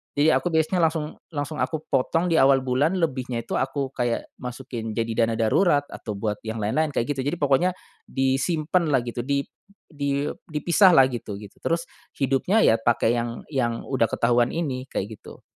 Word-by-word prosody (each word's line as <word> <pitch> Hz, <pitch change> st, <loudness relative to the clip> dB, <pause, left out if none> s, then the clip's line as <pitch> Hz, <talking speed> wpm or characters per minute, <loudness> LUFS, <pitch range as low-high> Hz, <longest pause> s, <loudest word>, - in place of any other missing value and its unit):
Jadi 145 Hz, +2 st, +4 dB
aku 175 Hz, +1 st, +1 dB
biasanya 160 Hz, +3 st, +2 dB
langsung 160 Hz, -1 st, 0 dB, 0.2 s
langsung 145 Hz, +1 st, -3 dB
aku 155 Hz, +4 st, -2 dB
potong 165 Hz, +7 st, +1 dB
diawal 135 Hz, -4 st, +5 dB
bulan 130 Hz, +6 st, +1 dB
lebihnya 130 Hz, -7 st, -1 dB
itu -, -, -2 dB
aku 135 Hz, +1 st, -1 dB
kayak 120 Hz, -2 st, -1 dB
masukin 125 Hz, -3 st, -6 dB
jadi 115 Hz, 0 st, +1 dB
dana 115 Hz, -, -2 dB
darurat 145 Hz, -, +3 dB
atau 110 Hz, -, -6 dB
buat 105 Hz, 0 st, -2 dB
yang 110 Hz, 0 st, -4 dB
lain-lain 145 Hz, +9 st, 0 dB
kayak 140 Hz, +4 st, -1 dB
gitu 130 Hz, -, -2 dB
jadi 145 Hz, -, 0 dB
pokoknya 145 Hz, +6 st, +2 dB, 0.3 s
disimpan 155 Hz, +6 st, 0 dB
lah 130 Hz, -, +4 dB
gitu 120 Hz, 0 st, -5 dB
dip 140 Hz, 0 st, -1 dB, 0.4 s
di 140 Hz, 0 st, -1 dB, 0.2 s
dipisah 170 Hz, +5 st, +4 dB
lah 135 Hz, -, +8 dB
gitu, 110 Hz, -5 st, -5 dB
gitu. 105 Hz, -2 st, -12 dB
Terus 170 Hz, +1 st, -1 dB, 0.3 s
hidupnya 140 Hz, -, +2 dB
ya 115 Hz, -, +5 dB
pake 115 Hz, 0 st, +2 dB
yang 120 Hz, -1 st, -3 dB
yang 120 Hz, -5 st, -1 dB
udah 130 Hz, -4 st, +2 dB
ketahuan 120 Hz, 0 st, +2 dB
ini 135 Hz, -6 st, -2 dB
kayak 105 Hz, +2 st, -4 dB
gitu. -, -, -13 dB
135 Hz, 175 wpm, -24 LUFS, 120-155 Hz, 0.4 s, lah